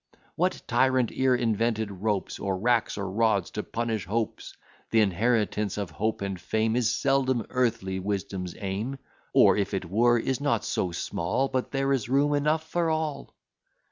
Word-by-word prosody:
"What - - -1
tyrant 130 -2 +2
e'er 130 -1 +2
invented 115 -2 0
ropes, 100 +1 -2
Or 95 -2 -1
racks, 115 +2 +1
or 100 -1 -3
rods, 105 -3 +1
to 105 - -3
punish 110 -5 -3
hopes? 110 +2 -3 0.3
Th' - - -4
inheritance 105 0 +2
of 100 -5 -3
hope 110 +4 -2
and 95 -2 -4
fame 110 +3 0
Is 120 -2 +2
seldom 130 -4 +1
Earthly 115 -7 0
Wisdom's 95 -2 -3
aim; 105 +7 -3 0.3
Or, - - +6
if 100 0 -1
it 95 - -3
were, 120 +7 +3
is 130 +3 -1
not 135 -7 +1
so 90 - -1
small, 85 +10 -1
But 130 -1 -1
there 135 0 0
is 120 -4 -1
room 140 +2 +3
enough 155 +2 +1
for 170 0 0
all." 155 -2 -3
115 Hz, 165 wpm, -27 LUFS, 100-130 Hz, 0.3 s, Or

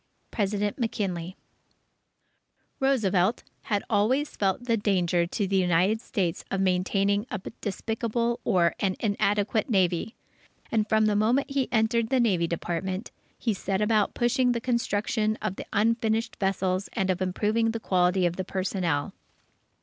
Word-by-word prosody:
_ - - -44
President 205 -1 -1
MCKINLEY 185 -6 -2 1.4
Roosevelt 220 -7 +2 0.2
had 205 -2 0
always 240 +8 +1
felt 195 +3 0
the 230 -2 +2
danger 180 -5 +1
to 200 +3 -2
the 195 0 +1
United 185 +4 +2
States 190 -10 -2
of 195 - -1
maintaining 195 +3 +1
a - - -3 0.2
despicable 230 +3 -2
or 170 -2 +3
an 190 -2 0
inadequate 205 +2 0
Navy, 185 +1 +1 0.6
and 215 -2 +1
from 220 0 +3
the 210 -1 +2
moment 240 +7 +2
he 275 -2 0
entered 225 0 +2
the 265 - +2
Navy 185 -8 +2
Department, 185 +4 -3 0.3
he 230 - 0
set 190 0 -2
about 210 -1 +2
pushing 245 +1 +2
the 235 - -1
construction 220 -2 0
of 190 - -3
the - - -8
unfinished 225 +1 +1
vessels 190 -1 0
and 190 -1 +1
of 185 0 -3
improving 210 +5 +1
the 225 0 -2
quality 180 -2 +2
of 175 0 -1
the 190 - -1
personnel. 185 -6 -2
205 Hz, 145 wpm, -27 LUFS, 185-225 Hz, 1.4 s, or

